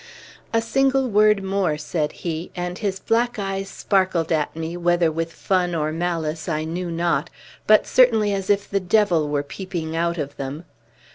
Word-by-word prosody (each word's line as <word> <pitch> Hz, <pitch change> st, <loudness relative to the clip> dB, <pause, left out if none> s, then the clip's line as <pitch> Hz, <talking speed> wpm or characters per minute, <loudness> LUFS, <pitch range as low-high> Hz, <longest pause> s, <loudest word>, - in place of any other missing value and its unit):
"A 225 Hz, 0 st, +1 dB
single 270 Hz, +2 st, +2 dB
word 210 Hz, -2 st, +4 dB
more," 190 Hz, -5 st, 0 dB
said 150 Hz, 0 st, -2 dB
he; 165 Hz, 0 st, -3 dB
and 180 Hz, 0 st, -4 dB
his 200 Hz, -3 st, -1 dB
black 235 Hz, +4 st, 0 dB
eyes 195 Hz, -1 st, -3 dB
sparkled 185 Hz, -6 st, 0 dB
at 155 Hz, -2 st, 0 dB
me, 165 Hz, +1 st, -4 dB
whether 175 Hz, -1 st, +2 dB
with 165 Hz, +1 st, -3 dB
fun 180 Hz, -1 st, 0 dB
or 155 Hz, -1 st, 0 dB
malice 165 Hz, -1 st, -2 dB
I 155 Hz, -1 st, -1 dB
knew 170 Hz, +3 st, -4 dB
not, 170 Hz, +1 st, 0 dB, 0.4 s
but 215 Hz, 0 st, +6 dB
certainly 225 Hz, -5 st, +4 dB
as 195 Hz, 0 st, -3 dB
if 200 Hz, -1 st, +2 dB
the 200 Hz, -, 0 dB
Devil 180 Hz, -5 st, +2 dB
were 145 Hz, -1 st, 0 dB
peeping 165 Hz, 0 st, -5 dB
out 170 Hz, +1 st, 0 dB
of 145 Hz, -2 st, -5 dB
them. 140 Hz, +5 st, -5 dB
175 Hz, 170 wpm, -22 LUFS, 160-200 Hz, 0.4 s, but